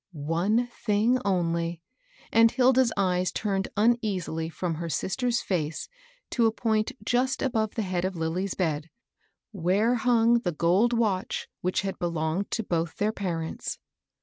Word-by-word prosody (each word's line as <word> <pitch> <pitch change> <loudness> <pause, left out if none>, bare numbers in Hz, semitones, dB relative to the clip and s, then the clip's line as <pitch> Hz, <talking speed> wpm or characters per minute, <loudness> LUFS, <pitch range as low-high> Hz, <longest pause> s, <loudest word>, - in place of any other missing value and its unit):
One 170 +10 +1
thing 240 +1 +1
only; 170 -3 -1 0.5
and 230 0 +6
Hilda's 255 0 +4
eyes 185 -2 +1
turned 195 -3 -1
uneasily 205 -8 +1
from, 170 +1 -3
her 165 +1 -4
sister's 240 +8 0
&ce 160 -5 -2 0.4
to 235 -2 +3
a - - +2
point 220 -1 0
just 255 +3 +1
above 220 -5 0
the 225 - -1
head 185 -2 -2
of 185 0 -2
Lilly's 175 +4 -2
bed, 160 -3 -1 0.6
where 200 +5 +2
hung 235 -1 +3
the 175 -7 -2
gold 180 +9 +3
watch 215 -6 0
which 185 +1 0
had 195 0 -4
belonged 170 +2 -1
to 225 - -1
both 170 -4 -1
their 210 +1 +1
parents. 170 -6 -4
195 Hz, 145 wpm, -27 LUFS, 170-230 Hz, 0.6 s, and